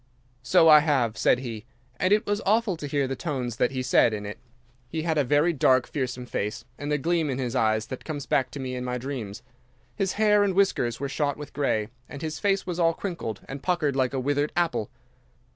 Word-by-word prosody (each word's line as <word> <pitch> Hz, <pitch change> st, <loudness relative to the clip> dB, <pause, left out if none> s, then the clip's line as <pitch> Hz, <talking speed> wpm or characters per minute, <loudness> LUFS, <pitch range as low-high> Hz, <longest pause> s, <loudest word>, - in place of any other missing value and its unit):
"'"So 130 Hz, +6 st, +4 dB
I 155 Hz, -1 st, +9 dB
have," 135 Hz, -7 st, +1 dB
said -, -, +3 dB
he, 115 Hz, -4 st, -6 dB, 0.4 s
and 185 Hz, -, +1 dB
it 210 Hz, +1 st, +4 dB
was 205 Hz, +1 st, -1 dB
awful 215 Hz, -1 st, +2 dB
to 150 Hz, -3 st, -6 dB
hear 140 Hz, -1 st, 0 dB
the 135 Hz, -, -3 dB
tones 130 Hz, -8 st, -3 dB
that 125 Hz, -, +2 dB
he 130 Hz, -1 st, -3 dB
said 120 Hz, -2 st, +4 dB
it 105 Hz, -1 st, -6 dB
in. 105 Hz, -, -4 dB, 0.6 s
He 160 Hz, +4 st, -3 dB
had 160 Hz, -2 st, +1 dB
a -, -, +3 dB
very 150 Hz, +6 st, +3 dB
dark, 130 Hz, -3 st, +3 dB
fearsome 125 Hz, -3 st, -3 dB
face, 115 Hz, 0 st, -4 dB
and 145 Hz, +1 st, -4 dB
a 150 Hz, -, +2 dB
gleam 165 Hz, +1 st, 0 dB
in 130 Hz, -, -2 dB
his 125 Hz, -2 st, -3 dB
eyes 110 Hz, -2 st, +2 dB
that 130 Hz, -, -7 dB
comes 145 Hz, -3 st, -5 dB
back 140 Hz, -4 st, +1 dB
to 145 Hz, -, -8 dB
me 130 Hz, -1 st, -4 dB
in 125 Hz, 0 st, -4 dB
my 125 Hz, 0 st, -2 dB
dreams. 120 Hz, -4 st, -6 dB, 0.5 s
His 195 Hz, -1 st, -1 dB
hair 210 Hz, -1 st, +4 dB
and 195 Hz, -2 st, 0 dB
whiskers 125 Hz, -, +1 dB
were 140 Hz, -, -2 dB
shot 145 Hz, 0 st, -1 dB
with 150 Hz, -1 st, -9 dB
grey, 110 Hz, -7 st, 0 dB, 0.2 s
and 140 Hz, +1 st, -8 dB
his 155 Hz, -1 st, -4 dB
face 195 Hz, -1 st, +1 dB
was 180 Hz, -1 st, -4 dB
all 165 Hz, -1 st, +3 dB
crinkled 170 Hz, -, -5 dB
and 135 Hz, 0 st, -7 dB
puckered 155 Hz, -6 st, 0 dB
like 130 Hz, -1 st, +1 dB
a -, -, 0 dB
withered 145 Hz, +3 st, 0 dB
apple. 165 Hz, -11 st, 0 dB
140 Hz, 230 wpm, -26 LUFS, 125-165 Hz, 0.6 s, I